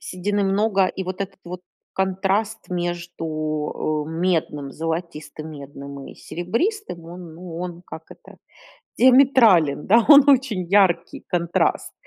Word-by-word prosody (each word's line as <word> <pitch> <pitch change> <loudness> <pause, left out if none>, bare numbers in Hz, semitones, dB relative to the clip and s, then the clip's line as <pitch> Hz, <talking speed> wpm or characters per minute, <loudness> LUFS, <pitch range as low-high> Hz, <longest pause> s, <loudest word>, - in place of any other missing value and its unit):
Седины 200 +3 -2
много, 195 0 +2
и 190 - -5
вот 185 +1 -6
этот 195 0 -5
вот 180 +1 -7 0.3
контраст 195 +3 -1
между, 175 -1 -4 0.8
э, - - -7
медным, 160 -4 -1
золотистым 160 -1 -5
медным 140 -1 -10
и - - -11
серебристым, 230 - -3
он, 170 -1 -10
ну 170 0 -9
он, 175 -1 -6
как 160 - -9
это, - - -15 0.6
диаметрален, 240 - +5
да, 230 +3 +5
он 285 -2 +8
очень 250 -9 +3
яркий 180 -2 +1
контраст, 170 -2 0
180 Hz, 125 wpm, -22 LUFS, 165-205 Hz, 0.8 s, он